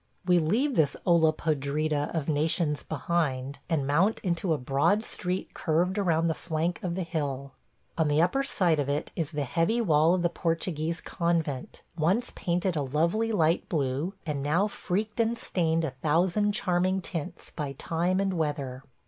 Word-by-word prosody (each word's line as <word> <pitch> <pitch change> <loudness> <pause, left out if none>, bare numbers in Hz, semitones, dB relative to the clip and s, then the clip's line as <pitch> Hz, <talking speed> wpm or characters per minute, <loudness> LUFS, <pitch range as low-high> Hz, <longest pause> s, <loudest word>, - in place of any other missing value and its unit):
We 180 -1 +5
leave 230 - +1
this 150 -3 +3
olla 170 -3 +5
podrida 150 -1 -1
of 155 -4 -1
nations 155 0 +1
behind, 140 -4 -2
and 155 -5 +1
mount 170 +10 +2
into 175 -1 -1
a 155 - +3
broad 140 - +1
street 180 +1 -3
curved 175 +5 0
around 165 -4 +2
the 165 - +2
flank 165 +2 -2
of 175 -2 -2
the 190 - -1
hill. 140 -5 -3 0.5
On 160 - +3
the 150 +1 +2
upper 180 +11 +3
side 180 - +1
of 140 -1 -1
it 145 +1 -2
is 160 -4 -1
the 150 -3 -2
heavy 165 - +1
wall 165 -5 +4
of 180 - -1
the - - +4
Portuguese 165 -1 -2
convent, 165 -6 -2
once 185 +10 +1
painted 180 +1 0
a 150 - 0
lovely 170 - +1
light 165 -5 +2
blue, 145 +4 -1
and 150 -4 -2
now 165 +8 +2
freaked 210 +2 -3
and 230 +1 +2
stained 165 -6 0
a 160 - -1
thousand 170 +9 +1
charming 185 -1 +1
tints 175 0 -6
by 145 -3 -3
time 170 +6 0
and 195 -1 0
weather. 145 -5 -2
165 Hz, 170 wpm, -28 LUFS, 150-180 Hz, 0.5 s, We